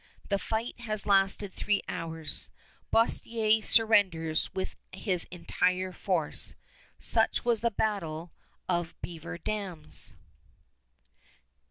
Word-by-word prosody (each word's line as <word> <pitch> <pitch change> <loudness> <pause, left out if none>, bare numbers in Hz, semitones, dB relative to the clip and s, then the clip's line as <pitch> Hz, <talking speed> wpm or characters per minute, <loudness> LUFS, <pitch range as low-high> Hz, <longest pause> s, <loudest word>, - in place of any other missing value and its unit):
The 200 -1 +1
fight 225 +3 -3
has 215 -3 -3
lasted 195 0 +3
three 205 -1 0
hours. 160 -3 -1 0.4
Boerstler 225 -1 +3
surrenders 190 -8 +3
with 190 - -4 0.2
his 180 -5 -2
entire 185 +1 0
force. 180 -5 +1 0.4
Such - - +3
was 235 -3 +2
the 235 - +2
battle 175 -7 -2 0.4
of 175 -2 -2
Beaver 170 +1 -6
Dams. 175 -5 -4
190 Hz, 95 wpm, -29 LUFS, 170-215 Hz, 0.4 s, lasted